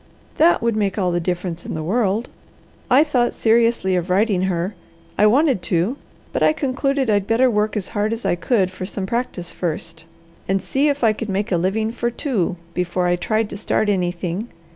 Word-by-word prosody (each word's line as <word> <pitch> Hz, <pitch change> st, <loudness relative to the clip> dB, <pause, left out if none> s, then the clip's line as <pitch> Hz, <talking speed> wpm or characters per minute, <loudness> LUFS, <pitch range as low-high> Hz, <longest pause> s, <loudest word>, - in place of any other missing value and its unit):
"That 330 Hz, -6 st, +4 dB
would 235 Hz, -2 st, +1 dB
make 200 Hz, -2 st, 0 dB
all 185 Hz, -3 st, +1 dB
the 175 Hz, -, 0 dB
difference 175 Hz, 0 st, -3 dB
in -, -, -5 dB
the 155 Hz, -, -3 dB
world. 215 Hz, +4 st, 0 dB, 0.6 s
I 265 Hz, +4 st, +6 dB
thought 250 Hz, -6 st, 0 dB
seriously 230 Hz, -4 st, +2 dB
of 180 Hz, 0 st, -1 dB
writing 195 Hz, 0 st, +2 dB
her. 185 Hz, +1 st, -1 dB, 0.4 s
I 210 Hz, -, +5 dB
wanted 265 Hz, -, +3 dB
to, 175 Hz, +8 st, 0 dB, 0.4 s
but -, -, -1 dB
I -, -, +5 dB
concluded 275 Hz, -2 st, 0 dB
I'd 205 Hz, -2 st, +1 dB
better 245 Hz, +3 st, +3 dB
work 210 Hz, 0 st, 0 dB
as 195 Hz, -, -3 dB
hard 210 Hz, -1 st, -1 dB
as 230 Hz, +1 st, -4 dB
I -, -, +2 dB
could 185 Hz, +2 st, +1 dB
for 185 Hz, 0 st, -6 dB
some 195 Hz, -1 st, -4 dB
practice 195 Hz, -6 st, -3 dB
first, 165 Hz, -1 st, -4 dB, 0.4 s
and 195 Hz, +1 st, +1 dB
see 270 Hz, +9 st, 0 dB
if 285 Hz, -2 st, 0 dB
I 220 Hz, -2 st, +5 dB
could 215 Hz, 0 st, -6 dB
make 200 Hz, +2 st, -1 dB
a -, -, +3 dB
living 210 Hz, +6 st, 0 dB
for 240 Hz, 0 st, -1 dB
two, 225 Hz, -, -1 dB, 0.2 s
before 180 Hz, 0 st, -1 dB
I 175 Hz, 0 st, +3 dB
tried 215 Hz, +4 st, 0 dB
to -, -, -5 dB
start 215 Hz, 0 st, 0 dB
anything. 180 Hz, +2 st, -2 dB
205 Hz, 200 wpm, -21 LUFS, 180-235 Hz, 0.6 s, I